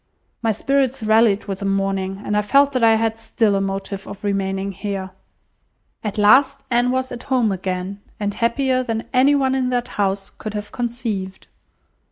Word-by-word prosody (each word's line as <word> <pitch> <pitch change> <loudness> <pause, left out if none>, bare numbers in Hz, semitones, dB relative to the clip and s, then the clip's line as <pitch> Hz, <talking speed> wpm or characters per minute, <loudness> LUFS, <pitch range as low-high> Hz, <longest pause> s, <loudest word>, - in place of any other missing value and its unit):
My 225 - +2
spirits 265 +2 0
rallied 220 -1 +3
with 195 -2 -4
the 200 - -4
morning, 195 0 -1
and 210 - -1
I 210 - +3
felt 280 +7 +4
that 255 -2 0
I 225 -1 +6
had 225 0 0
still 225 -1 +1
a 195 - +1
motive 195 0 -3
for 200 - -8
remaining 195 -1 -1
here." 195 -1 -5 0.9
At 210 -1 -3
last 265 +6 +5
Anne 245 +1 +3
was 260 0 -1
at 245 -1 -6
home 245 -5 +2
again, 185 +1 -4 0.2
and 205 -1 -1
happier 255 +3 +1
than 225 -3 -3
any 265 +3 +5
one 265 -2 +2
in 260 -1 0
that 245 0 -1
house 195 -1 -1
could 215 -1 -7
have 210 0 -5
conceived. 230 -6 -3
215 Hz, 180 wpm, -21 LUFS, 195-250 Hz, 0.9 s, I